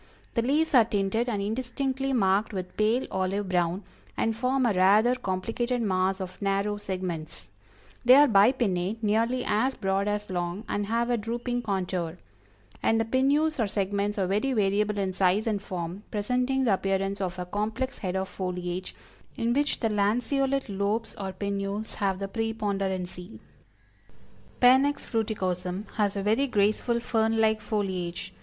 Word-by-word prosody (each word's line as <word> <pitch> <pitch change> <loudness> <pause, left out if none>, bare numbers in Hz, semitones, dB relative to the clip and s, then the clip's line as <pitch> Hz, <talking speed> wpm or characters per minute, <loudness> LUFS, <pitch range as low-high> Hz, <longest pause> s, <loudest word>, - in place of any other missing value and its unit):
The 230 - +1
leaves 295 +7 +1
are 245 -4 +8
tinted 215 +2 0
and 205 -4 -1
indistinctly 260 +4 -2
marked 205 -3 +2
with 185 -2 -5
pale 220 +4 +2
olive 190 +2 -1
brown, 180 +1 0 0.3
and 225 -1 +1
form 255 +3 +1
a 230 - +3
rather 205 +6 +5
complicated 235 +3 -2
mass 190 -3 +1
of 185 0 -7
narrow 200 +1 0
segments; 180 -5 -5 0.5
they 250 +1 +8
are 290 +1 +8
bipinnate, 210 -2 +2
nearly 230 +4 +1
as 255 +6 +1
broad 195 0 0
as 210 -1 -2
long, 175 +3 -3
and 205 0 -2
have 235 +2 0
a 240 - +2
drooping 240 +3 -3
contour; 180 -5 -2 0.6
and 225 - +2
the 225 - +1
pinnules 280 +6 +2
or 225 - +2
segments 200 +1 -1
are 195 - +1
very 210 +8 0
variable 210 -1 +1
in 190 -2 -1
size 190 +3 +2
and 210 -3 -1
form, 180 0 -5
presenting 250 +5 0
the 225 -6 +3
appearance 195 +1 -1
of 180 -2 -3
a 180 - -4
complex 215 +7 -3
head 185 -2 -3
of 190 0 -1
foliage 180 -1 -4 0.4
in 230 +1 +1
which 290 +2 0
the 225 - +2
lanceolate 250 +6 +1
lobes 205 +2 -1
or 195 -1 -3
pinnules 200 +2 -3
have 195 -2 -1
the 195 +1 -4
preponderancy." 195 -4 -3 1.2
Panax 265 +3 +4
Fruiticosm 190 -4 -2
has 205 -2 +1
a 200 - -2
very 225 +7 +2
graceful 215 +1 +1
fern 225 -1 +1
like 220 -1 +3
foliage. 190 -5 -3
205 Hz, 155 wpm, -27 LUFS, 190-235 Hz, 1.2 s, are